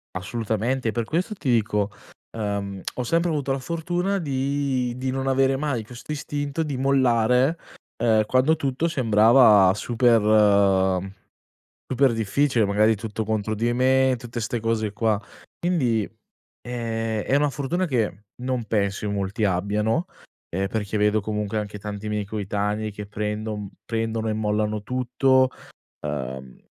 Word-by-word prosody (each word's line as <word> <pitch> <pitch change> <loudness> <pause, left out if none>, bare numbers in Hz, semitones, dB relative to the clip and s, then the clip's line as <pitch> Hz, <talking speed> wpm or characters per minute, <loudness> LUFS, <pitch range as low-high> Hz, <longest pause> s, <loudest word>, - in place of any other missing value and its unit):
Assolutamente, 110 +5 -1
per 115 0 -1
questo 175 - -2
ti 140 -9 -3
dico, 105 -3 +1 0.5
uhm, 100 -2 -3
ho 125 - -2
sempre 170 +7 +1
avuto 145 -3 -1
la 135 - 0
fortuna 175 +7 -1
di 135 -4 -1
di 130 0 -2
non 135 0 -2
avere 135 0 +3
mai 135 -5 -2
questo 120 +6 -10
istinto 145 +1 -3
di 145 -4 -3
mollare, 130 +1 +3 0.5
uhm, 110 -2 +4
quando 130 +7 +3
tutto 140 +1 -1
sembrava 115 - +5
super 105 -5 +3 0.8
super 130 0 +3
difficile, 115 +2 +1
magari 105 +2 +3
tutto 110 +1 -4
contro 110 0 -1
di 115 +3 0
me, 130 +1 +3
tutte 120 0 -6
'ste 115 +1 -2
cose 110 -2 -1
qua. 105 0 +1 0.4
Quindi 130 - +1 0.6
è 115 -3 -3
è 135 - +2
una 145 +1 +3
fortuna 145 +7 -1
che 115 - -1 0.2
non 125 -2 -2
penso 100 -1 -1
in 100 - -1
molti 100 +2 -2
abbiano, 105 - +1 0.4
ehm, 95 +3 -1
perché 105 0 -2
vedo 105 +1 +2
comunque 105 0 -2
anche 105 0 -5
tanti 105 +1 -6
miei 105 -1 -2
coetanei 105 +1 -2
che 105 0 -7
prendon 105 0 -4 0.2
prendono 115 -1 -2
e - - 0
mollano 105 0 -1
tutto, 130 +2 +2 0.5
uhm, 65 -3 -5
115 Hz, 140 wpm, -24 LUFS, 105-130 Hz, 0.8 s, sembrava